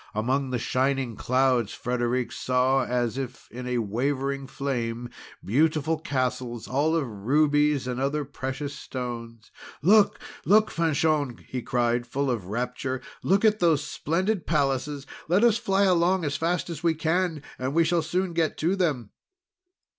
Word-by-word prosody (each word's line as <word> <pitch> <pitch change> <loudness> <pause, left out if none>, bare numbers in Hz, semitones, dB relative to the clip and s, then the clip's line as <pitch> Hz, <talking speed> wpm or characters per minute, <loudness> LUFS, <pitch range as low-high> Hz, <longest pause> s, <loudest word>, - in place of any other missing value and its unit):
Among 130 +5 0
the 125 - -1
shining 130 0 0
clouds, 125 -2 +1
Frederic 125 0 -1
saw, 130 +1 +1
as 120 +1 -1
if 125 -2 -6
in 125 -2 -2
wavering 135 +3 -1
flame, 120 -4 -3 0.3
beautiful 155 +6 +2
castles 130 -5 -2
all 150 +5 +1
of 160 -4 +1
rubies 145 +6 +2
and 125 0 -3
other 140 +2 -1
precious 140 +1 -5
stones. 115 -3 -7 0.3
"Look! 205 +4 +5 0.2
Look! 215 +2 +4
Fanchon!" 155 -5 0
he 125 - -4
cried, 120 -1 0
full 140 +2 -1
of 110 -7 -3
rapture. 125 +4 -3 0.2
"Look 195 +3 +2
at 215 0 +4
those 160 -4 +3
splendid 185 +7 -1
palaces! 140 -1 0 0.2
Let 180 +7 +3
us 235 -1 +4
fly 200 -4 +2
along 180 -1 +3
as 140 -1 -1
fast 170 +3 -1
as 155 -3 -6
we 165 -1 +2
can, 160 -1 0 0.2
and 130 +3 -2
we 165 - +5
shall 170 +1 +2
soon 180 +3 -1
get 165 -1 0
to 170 +5 +1
them." 145 - -1
140 Hz, 145 wpm, -26 LUFS, 125-160 Hz, 0.3 s, Look